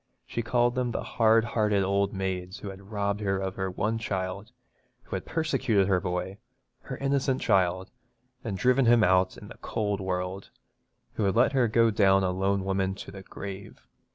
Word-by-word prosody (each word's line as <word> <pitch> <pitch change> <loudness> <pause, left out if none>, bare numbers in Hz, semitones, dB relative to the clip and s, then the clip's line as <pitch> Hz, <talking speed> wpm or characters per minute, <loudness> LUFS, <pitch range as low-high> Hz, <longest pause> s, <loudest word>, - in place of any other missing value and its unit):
She 115 - -3
called 120 +1 +2
them 125 -1 -1
the 115 - -3
hard 115 -1 +3
hearted 105 -4 +1
ould 100 +1 +1
maids 95 -1 -3
who 100 - -7
had 95 +1 -13
robbed 100 -1 -1
her 95 -2 0
of 95 -1 -3
her 95 0 -3
one 105 +5 -1
child, 100 0 -4 0.5
who - - -6
had - - -5
persecuted 135 - +1
her 95 -2 +3
boy 90 +3 -3 0.4
her - - -7
innocent 135 -1 0
child, 95 0 +1 0.5
and 100 -4 -3
driven 125 +3 +3
him 120 -1 +6
out 95 0 +3
in - - -11
the - - -12
cold 105 -2 -2
world, 95 +1 -3 0.6
who 110 - -1
had 95 - +1
left 120 +4 +4
her 130 -3 +3
to - - -7
go 115 0 +4
down 95 -2 +4
a 90 - +1
lone 95 +1 0
woman 95 0 0
to 95 - -9
the 95 0 -9
grave. 95 -8 -9
100 Hz, 190 wpm, -27 LUFS, 95-115 Hz, 0.6 s, him